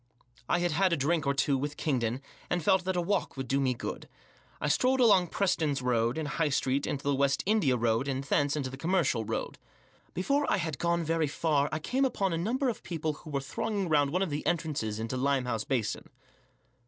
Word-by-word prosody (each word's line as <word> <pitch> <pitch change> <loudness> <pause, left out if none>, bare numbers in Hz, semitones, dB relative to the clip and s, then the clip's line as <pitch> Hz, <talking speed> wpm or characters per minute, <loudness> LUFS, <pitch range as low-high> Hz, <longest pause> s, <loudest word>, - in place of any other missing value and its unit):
I - - +3
had 175 0 0
had 185 +4 +2
a 170 - +2
drink 150 +2 0
or 140 - +2
two 140 -1 +2
with 145 +2 -4
Kingdon, 125 -3 -1 0.3
and 180 -2 0
felt 190 0 +3
that 185 0 -1
a 175 - +1
walk 185 -4 -1
would 130 -1 -4
do 135 +3 +1
me 130 -2 +1
good. - - -6 0.5
I - - -1
strolled 255 - +2
along 205 -7 +5
Preston's 160 -6 0
Road 120 0 +1
and 155 -2 -2
High 150 +1 0
Street, 135 0 0
into 140 - -3
the 145 - +1
West 140 0 +1
India 180 - +2
Road, 115 +2 +1
and 135 0 -2
thence* 145 +1 +1
into' 135 -4 -3
the 135 - -8
Commercial 160 -8 +1
Road. 110 - -4 0.6
Before 280 +10 +1
I - - +3
had 160 -6 -3
gone 170 0 +1
very 165 -1 +1
far 145 -1 +1
I 155 - -1
came 255 - -1
upon 200 -8 0
a - - 0
number 250 +9 0
of 235 - -2
people 160 -3 -3
who 150 - -12
were 140 -2 -1
thronging 195 +6 -2
round 145 -2 +3
one 180 +6 +1
of 185 - -3
the 145 +1 -2
entrances 150 -11 -1
into 115 +3 -3
Limehouse 125 -4 0
Basin. 120 -6 -2
150 Hz, 215 wpm, -29 LUFS, 135-175 Hz, 0.6 s, along